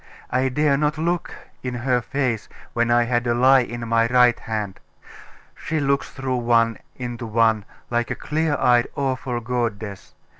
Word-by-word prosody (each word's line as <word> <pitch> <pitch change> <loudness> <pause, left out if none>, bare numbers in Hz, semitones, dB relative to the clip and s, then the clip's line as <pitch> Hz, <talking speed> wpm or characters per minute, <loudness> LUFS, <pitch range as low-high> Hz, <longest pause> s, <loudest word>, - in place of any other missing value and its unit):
I 130 +1 +2
dare 140 +1 +2
not 150 +1 0
look 170 +2 -1 0.3
in 125 -1 -4
her 125 0 +1
face 125 -4 -2 0.2
when 120 0 +1
I 120 0 +4
had 120 0 0
a 120 - +2
lie 130 +2 +6
in 120 -1 -4
my 115 0 +3
right 125 -1 +4
hand.... 105 -3 -4 0.7
She 160 - -3
looks 140 -1 0
through 130 -2 -3
one 115 -2 +2 0.2
into 120 -1 -5
one 110 -1 +2 0.3
like 120 -1 0
a - - -2
clear 155 -1 -1
eyed 120 -1 +4
awful 130 -3 -2
goddess.... 115 -4 -4
120 Hz, 160 wpm, -22 LUFS, 115-135 Hz, 0.7 s, lie